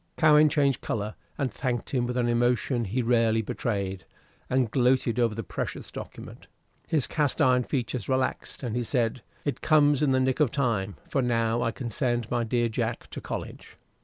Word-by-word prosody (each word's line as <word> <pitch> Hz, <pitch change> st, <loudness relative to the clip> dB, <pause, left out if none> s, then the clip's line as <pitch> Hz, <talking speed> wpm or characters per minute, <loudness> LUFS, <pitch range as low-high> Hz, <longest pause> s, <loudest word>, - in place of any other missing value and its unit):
Cowen 155 Hz, -1 st, +6 dB
changed 140 Hz, -4 st, +2 dB
color, 105 Hz, -1 st, -3 dB, 0.2 s
and 135 Hz, -3 st, -1 dB
thanked 125 Hz, -3 st, -2 dB
him 125 Hz, -3 st, 0 dB
with 125 Hz, 0 st, -2 dB
an 120 Hz, -1 st, +2 dB
emotion 120 Hz, +1 st, +1 dB
he 120 Hz, +6 st, -1 dB
rarely 115 Hz, -1 st, +3 dB
betrayed, 100 Hz, -4 st, -3 dB, 0.5 s
and 125 Hz, -3 st, +1 dB
gloated 125 Hz, -2 st, +2 dB
over 115 Hz, -3 st, +2 dB
the 115 Hz, -, -4 dB
precious -, -, -5 dB
document. -, -, -9 dB, 0.4 s
His 155 Hz, -6 st, +1 dB
cast 150 Hz, -2 st, 0 dB
iron 125 Hz, -4 st, +4 dB
features 125 Hz, -5 st, -3 dB
relaxed, 130 Hz, +1 st, -1 dB
and 120 Hz, -3 st, -2 dB
he 120 Hz, -, 0 dB
said, 120 Hz, 0 st, 0 dB, 0.2 s
"It 145 Hz, -, -2 dB
comes 145 Hz, -2 st, +4 dB
in 150 Hz, -, +3 dB
the 130 Hz, -, +3 dB
nick 130 Hz, 0 st, +1 dB
of 150 Hz, -4 st, +4 dB
time, 110 Hz, -8 st, -1 dB
for 135 Hz, -, 0 dB
now 115 Hz, -1 st, +1 dB
I 115 Hz, -, +1 dB
can 120 Hz, 0 st, -5 dB
send 120 Hz, -2 st, -1 dB
my 120 Hz, -1 st, +1 dB
dear 120 Hz, +1 st, +1 dB
Jack 115 Hz, +1 st, -3 dB
to -, -, -6 dB
college." -, -, -7 dB
120 Hz, 185 wpm, -27 LUFS, 115-130 Hz, 0.5 s, Cowen